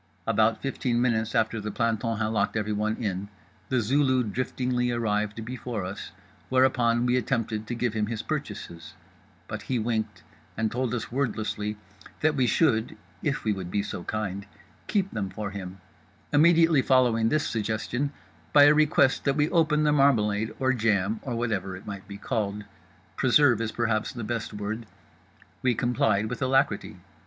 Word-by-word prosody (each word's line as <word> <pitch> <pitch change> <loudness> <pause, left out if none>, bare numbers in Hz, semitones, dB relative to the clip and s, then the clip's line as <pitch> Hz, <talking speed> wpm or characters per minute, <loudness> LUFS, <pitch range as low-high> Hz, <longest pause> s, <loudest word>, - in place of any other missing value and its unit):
About 110 0 +2
fifteen 125 -3 -1
minutes 115 -3 +1
after 110 0 +1
the 105 - -4
planton 115 +1 -1
had 110 - 0
locked 110 -1 0
everyone 105 +1 -1
in, 100 -3 -3 0.4
The 130 -2 +2
Zulu 130 +2 +2
driftingly 125 +2 -1
arrived 105 -1 -1
before 120 -4 -4
us; 95 +2 -6 0.4
whereupon 125 -2 +3
we 125 0 +2
attempted 115 -4 -1
to 120 - -3
give 120 -1 -1
him 105 -1 0
his 110 -1 -4
purchases—but 85 -1 -7
he 130 - -2
winked 110 -2 -2 0.3
and 110 -1 0
told 125 0 -1
us 115 -1 -5
wordlessly 110 -5 -2 0.4
that 155 0 +3
we 130 -3 +2
should 115 -6 +2 0.2
(if - - -1
we 105 - +1
would 95 -3 -6
be 100 +2 0
so 90 - -5
kind) 100 -2 -3 0.4
keep 195 -2 0
them 100 -3 -3
for 105 -1 -5
him, 95 -1 -7 0.5
immediately 165 -1 +5
following 120 -4 +3
this 155 +2 +1
suggestion 115 +5 -2 0.4
by 145 - +8
a 145 +1 +8
request 150 -3 +3
that 140 -1 +2
we 150 +1 +2
open 155 -3 +3
the 150 - +3
marmalade 110 -7 +3
or 130 0 +2
jam 105 -2 +1
or 125 -3 -4
whatever 100 -6 -2
it 95 - -13
might 100 -1 -7
be 100 -1 -8
called—preserve 115 +5 0
is 110 -1 -2
perhaps 115 -2 0
the 120 - -6
best 115 0 -3
word. 105 +2 -5 0.7
We 125 -2 +2
complied 110 -4 +1
with 120 +4 -5
alacrity. 130 -7 +1
115 Hz, 160 wpm, -27 LUFS, 105-130 Hz, 0.7 s, by